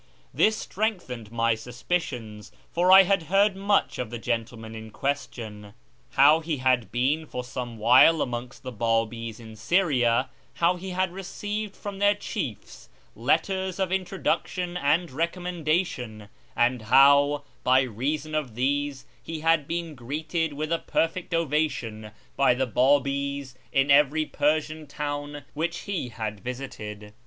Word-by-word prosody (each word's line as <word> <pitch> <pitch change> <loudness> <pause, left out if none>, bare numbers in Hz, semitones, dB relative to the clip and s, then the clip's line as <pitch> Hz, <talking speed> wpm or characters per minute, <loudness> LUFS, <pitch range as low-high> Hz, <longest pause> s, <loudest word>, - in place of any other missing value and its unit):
This 215 0 +3
strengthened 175 - -3
my 115 0 +2
suspicions, 120 -2 -4 0.2
for 180 +2 +3
I 190 +1 +10
had 195 0 +2
heard 195 +1 +4
much 200 +1 +1
of 125 - -3
the 120 - -5
gentleman 115 -1 -4
in 110 0 -8
c^uestion: 110 -6 -4 0.4
how 150 +4 +6
he 160 -2 -3
had 130 -2 +1
been 145 +6 0
for 125 - -5
some 125 -1 -6
while 125 +8 +6
amongst 125 +1 -6
the 130 - -5
B;ibis 115 0 -1
in 110 -1 -11
Syria, 125 - +2 0.2
how 170 +2 +2
he 185 +2 -7
had 185 -1 -1
received 205 +2 -5
from 200 -1 -7
their 205 0 +4
chiefs - - -6 0.3
letters 190 -1 0
of 190 -2 -1
introduction 185 -1 -1
and 170 0 +1
recommendation, 160 - -2 0.3
and 120 0 +2
how, 140 +5 +5 0.2
by 130 +1 +5
reason 140 +6 -3
of 145 -7 -2
these, 140 +2 -1 0.2
he 160 -1 -6
had 165 -3 +2
been 170 -1 -3
greeted 155 +5 -3
with 155 +2 -4
a 165 - +1
perfect 165 +2 -1
ovation 150 -9 -1 0.3
by 135 -3 +4
the 130 +1 0
Babis 140 +2 +1 0.2
in 135 +1 +2
every 150 +2 +4
Persian 155 +1 -1
town 145 0 -5
which 165 +3 -2
he 190 -11 -3
had 110 -3 -5
visited. 105 -3 -7
140 Hz, 140 wpm, -26 LUFS, 120-170 Hz, 0.4 s, I